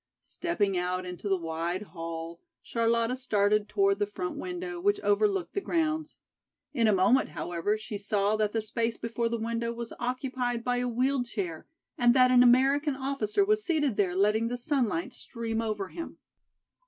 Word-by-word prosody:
Stepping 210 - -1
out 180 +1 -2
into 180 +3 -5
the 195 - +3
wide 170 +3 -3
hall 165 -1 -6 0.2
Charlotta 230 +1 +1
started 210 -4 +1
toward 195 0 +2
the 205 - +1
front 180 -3 -4
window 360 0 -5
which 410 +2 +2
overlooked 410 -3 +1
the 400 - -1
grounds. 315 -3 -1 0.6
In 235 -5 +2
a - - +5
moment, 210 +7 +3
however, 175 +5 -2
she 215 -1 -6
saw 205 +1 +1
that 215 -1 +1
the 225 0 -1
space 230 +1 -2
before 230 0 -2
the 235 - -1
window 230 +1 -2
was 235 0 -6
occupied 250 -1 -2
by 245 0 0
a 250 0 0
wheeled 250 +1 0
chair 180 -9 -4 0.3
and 240 0 +5
that 255 -1 +6
an 250 -1 +7
American 270 +4 +4
officer 270 - 0
was 425 +1 +2
seated 300 - +1
there 185 -3 +1
letting 210 +4 +2
the 245 +1 -3
sunlight 240 - 0
stream 230 -2 -4
over 210 -4 -3
him. 335 - -7
230 Hz, 170 wpm, -28 LUFS, 205-265 Hz, 0.6 s, an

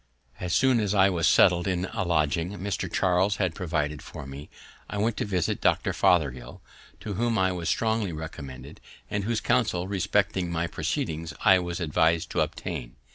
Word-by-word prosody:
As 90 -1 -3
soon 130 +4 +4
as 105 -1 0
I 100 0 +5
was 85 -3 +1
settled 85 0 +5
in 90 -1 0
a - - -1
lodging 85 +1 0
Mr. 100 +2 -3
Charles 95 +3 +2
had 95 -5 0
provided 75 -4 -2
for 80 -2 -9
me, 70 +2 -9 0.4
I 105 - -4
went 110 +2 +1
to - - -1
visit 95 -5 -1
Dr. - - +2
Fothergill, 65 -7 +1 0.4
to 105 - -4
whom 115 +3 0
I 95 -1 +2
was 85 -2 -3
strongly 110 -4 0
recommended, 75 -4 -8 0.3
and 100 -1 -1
whose 115 -1 -1
counsel 110 -7 +1
respecting 95 -1 0
my 85 0 -1
proceedings 80 -1 -3
I 95 -1 +7
was 85 0 -4
advis'd 80 0 +1
to - - +1
obtain. - - -4
90 Hz, 175 wpm, -26 LUFS, 80-100 Hz, 0.4 s, I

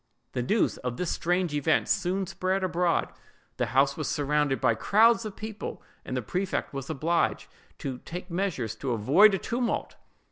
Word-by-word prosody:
The 125 - -2
news 210 - +1
of 125 -1 -4
this 180 - -1
strange 175 -1 0
event 145 -2 +2
soon 190 -2 0
spread 185 +2 -1
abroad, 175 -1 +1 0.4
the - - 0
house 135 +3 +3
was 155 - -3
surrounded 145 -1 +1
by - - +3
crowds 225 - +4
of 210 -2 -6
people, 215 -1 -6 0.2
and 130 - -4
the 125 - -2
prefect 185 - -2
was 135 -1 -5
obliged 145 -7 0 0.3
to 130 -2 -5
take 180 +5 -8
measures 170 - -1
to 130 -1 -2
avoid 160 - +5
a - - 0
tumult. 240 +4 -2
170 Hz, 170 wpm, -27 LUFS, 135-195 Hz, 0.4 s, avoid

